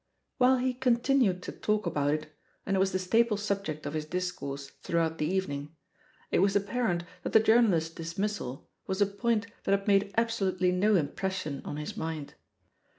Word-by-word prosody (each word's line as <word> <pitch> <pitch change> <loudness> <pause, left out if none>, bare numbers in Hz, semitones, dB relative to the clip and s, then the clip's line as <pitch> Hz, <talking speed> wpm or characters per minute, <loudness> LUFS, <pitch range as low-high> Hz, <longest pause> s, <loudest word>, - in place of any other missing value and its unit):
While 255 +1 +5
he 255 0 0
continued 245 -6 +2
to - - -5
talk 215 0 -1
about 145 0 +1
it, 155 0 -3 0.3
and 195 - 0
it - - +2
was 190 0 +2
the 185 - +1
staple 215 +4 +2
subject 200 -7 -3
of 145 - -3
his 155 -1 -2
discourse 145 -6 -4
throughout 165 -1 0
the 150 - +1
evening, 155 -5 -2 0.6
it - - +3
was 200 0 +3
apparent 200 -3 0 0.2
that - - -4
the 220 - +8
journalist's 215 -8 +3
dismissal 165 -5 -4 0.2
was 190 +1 -2
a 205 - +5
point 210 +3 0 0.2
that 195 - +3
had 195 - -12
made 200 0 +3
absolutely 195 -6 +1
no 205 +4 +3
impression 160 -2 -2
on 145 - -4
his 150 - -5
mind. 160 -3 -4
190 Hz, 175 wpm, -29 LUFS, 160-210 Hz, 0.6 s, the